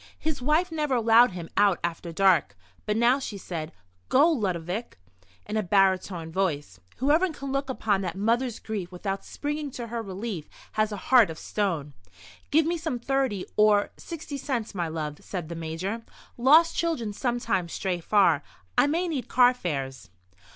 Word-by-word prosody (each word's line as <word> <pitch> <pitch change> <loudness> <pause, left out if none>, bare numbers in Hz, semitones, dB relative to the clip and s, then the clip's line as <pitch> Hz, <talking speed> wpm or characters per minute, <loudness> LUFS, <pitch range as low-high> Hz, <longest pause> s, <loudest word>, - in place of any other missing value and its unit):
His 310 -4 -3
wife 310 +7 +2
never 300 -4 0
allowed 230 -1 +5
him 170 -2 -6
out 200 -3 +4
after 170 0 -3
dark. 165 - +3 0.3
But 210 0 +1
now 240 +4 +4
she 220 -6 -5
said: 165 -4 -5 0.4
"Go, 295 +6 +5
Ludovic!" 195 - -2 0.5
in 215 - -3
a - - +2
baritone 185 -3 +1
voice. 150 - -2 0.2
"Whoever 310 +7 +3
can 275 -3 -6
look 275 0 -1
upon 210 -6 0
that 180 -3 -3
mother's 230 +3 +1
grief 200 -5 -5
without 195 +2 -4
springing 295 0 -4
to 240 - -5
her 235 0 -3
relief 195 -4 -5 0.2
has 215 0 0
a 210 - -4
heart 245 -7 +7
of 160 - -6
stone." 165 -10 -2 0.6
"Give 310 +1 +4
me 340 +1 0
some 315 -6 -2
thirty 255 -5 -1
or—sixty 215 +8 +1
cents, 245 -6 -3
my 175 -4 -2
love," 155 -2 -4
said 175 -5 -5
the 170 - -5
Major. 165 +7 -4 0.3
"Lost 310 +7 +5
children 260 -11 -1
sometimes 230 -7 -1
stray 185 -2 -2
far. 170 -4 +3 0.3
I - - +5
may 335 +5 0
need 280 -8 -3
carfares." 150 - +1
215 Hz, 160 wpm, -26 LUFS, 175-265 Hz, 0.6 s, heart